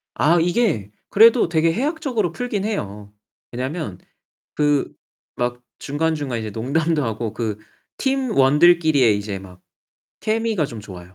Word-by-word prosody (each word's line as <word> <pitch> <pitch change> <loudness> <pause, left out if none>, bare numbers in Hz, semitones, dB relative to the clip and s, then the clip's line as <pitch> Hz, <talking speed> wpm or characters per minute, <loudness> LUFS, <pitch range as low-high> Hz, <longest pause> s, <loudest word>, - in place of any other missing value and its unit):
아 170 +4 +3
이게 175 - +1 0.2
그래도 230 -1 +6
되게 165 0 +2
해학적으로 255 - -1
풀긴 210 -2 -3
해요. 105 - -4 0.4
왜냐하면 125 - -4 0.6
그 145 -2 +1 0.4
막 120 0 -2 0.2
중간중간 145 -4 -2
이제 110 -1 -4
농담도 150 +8 0
하고 110 -1 -3
그 110 -2 -3 0.4
팀원들끼리의 160 - +3
이제 100 -1 -5
막 90 -1 -13 0.6
케미가 220 -6 0
좀 115 -5 -8
좋아요. 95 -2 -11
150 Hz, 275 characters per minute, -21 LUFS, -, 0.6 s, 그래도